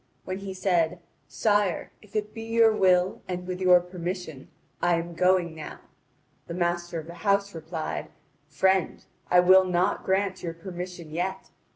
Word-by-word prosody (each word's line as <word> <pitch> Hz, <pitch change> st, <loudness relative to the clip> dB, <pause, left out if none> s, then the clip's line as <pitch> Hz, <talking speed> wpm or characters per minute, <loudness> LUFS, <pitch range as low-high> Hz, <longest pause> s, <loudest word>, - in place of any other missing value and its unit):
When 185 Hz, +1 st, -4 dB
he 195 Hz, -1 st, -6 dB
said: 175 Hz, -3 st, +1 dB, 0.3 s
"Sire, 205 Hz, -4 st, +1 dB
if 210 Hz, -1 st, -19 dB
it 210 Hz, 0 st, -2 dB
be 225 Hz, -, -7 dB
your 225 Hz, -1 st, +3 dB
will, 185 Hz, -2 st, +3 dB
and 180 Hz, -1 st, -4 dB
with 185 Hz, 0 st, -5 dB
your 180 Hz, -1 st, +7 dB
permission, 175 Hz, -4 st, -6 dB, 0.3 s
I 175 Hz, 0 st, +3 dB
am 170 Hz, +1 st, -4 dB
going 180 Hz, -1 st, +2 dB
now," 155 Hz, -1 st, -8 dB, 0.7 s
the 170 Hz, -, -5 dB
master 175 Hz, -1 st, -1 dB
of 155 Hz, -, -8 dB
the 170 Hz, -, -9 dB
house 200 Hz, +1 st, +1 dB
replied: 160 Hz, 0 st, -5 dB, 0.4 s
"Friend, 190 Hz, +5 st, +1 dB, 0.2 s
I 180 Hz, 0 st, +6 dB
will 185 Hz, +1 st, +7 dB
not 180 Hz, +2 st, 0 dB
grant 190 Hz, 0 st, 0 dB
you 170 Hz, -1 st, -4 dB
permission 175 Hz, -1 st, -8 dB
yet. 185 Hz, +4 st, -3 dB
180 Hz, 160 wpm, -26 LUFS, 170-190 Hz, 0.7 s, your